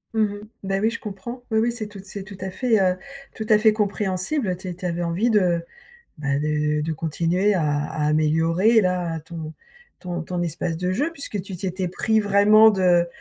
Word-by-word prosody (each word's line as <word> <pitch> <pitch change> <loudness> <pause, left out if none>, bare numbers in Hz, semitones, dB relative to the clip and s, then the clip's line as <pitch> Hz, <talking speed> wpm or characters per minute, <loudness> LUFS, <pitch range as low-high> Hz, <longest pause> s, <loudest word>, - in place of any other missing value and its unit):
Mmh 220 - +3
mh. 205 0 -6 0.2
Beh, 195 0 -1
oui, 220 +2 +2
je 230 - -5
comprends. 215 +5 -7
Oui, 220 - +1
oui, 235 +2 +2
c'est 230 -3 -5
tout, 205 -1 -11
c'est 195 0 -7
tout 195 0 -11
à 190 0 -4
fait, 230 0 +1
heu, 185 -1 +2 0.4
tout 220 - -5
à 215 - +7
fait 215 0 +4
compréhensible, 205 +4 -1
heu, 180 - 0
tu 185 +1 -9
é - - -3
tu - - -16
é - - -22
tu - - -6
avais 175 -1 -2
envie 180 +8 +1
de, 175 -5 +2 0.5
bah, 140 -1 -1
de 150 0 0
de 160 +1 -2
continuer 170 +6 0
à 180 - +1
à 150 +1 -1
améliorer 165 +8 +3
là, 180 -3 -1
ton 160 0 -8 0.5
ton 175 -2 -4
ton 175 +1 -3
espace 170 0 -2
de 180 +1 -1
jeu, 290 - 0
puisque 280 -9 -4
tu 195 0 -7
t'étais 185 +1 -3
pris 220 +5 +1
vraiment 210 +2 +6
de 180 -3 +3
185 Hz, 220 wpm, -23 LUFS, 170-210 Hz, 0.5 s, à